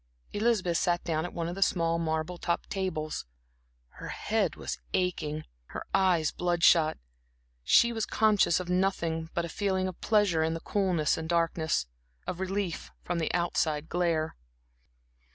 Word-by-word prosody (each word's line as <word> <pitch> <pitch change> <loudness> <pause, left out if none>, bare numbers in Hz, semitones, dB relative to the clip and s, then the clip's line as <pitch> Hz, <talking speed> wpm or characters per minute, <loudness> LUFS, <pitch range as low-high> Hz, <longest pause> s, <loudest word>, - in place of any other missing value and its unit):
Elizabeth 205 -6 +1
sat 175 0 +1
down 160 -1 -1
at 175 - -5
one 170 -1 -2
of 170 - -3
the 195 - -7
small 165 -3 +2
marble 160 +2 -2
topped 170 - -2
tables; 160 - -3 0.6
her - - -10
head - - -1
was - - -5 0.2
aching, 155 -4 -1 0.2
her - - -7
eyes 180 -5 +3
blood 175 -1 -1
shot, 160 -3 +5 0.7
she 235 - +5
was 225 -2 -2
conscious 210 -6 +3
of 180 - -5
nothing 175 -3 0
but 170 - 0
a - - -4
feeling 190 +2 -1
of 185 - -7
pleasure 205 -7 +3
in 160 +1 +1
the - - -4
coolness 180 -7 +1
and 160 0 -5
darkness, 165 - +1 0.4
of 175 - -4
relief 190 -2 -2
from 175 -1 -2
the 160 - 0
outside 160 -3 0
glare. 165 -3 0
170 Hz, 155 wpm, -29 LUFS, 160-185 Hz, 0.7 s, shot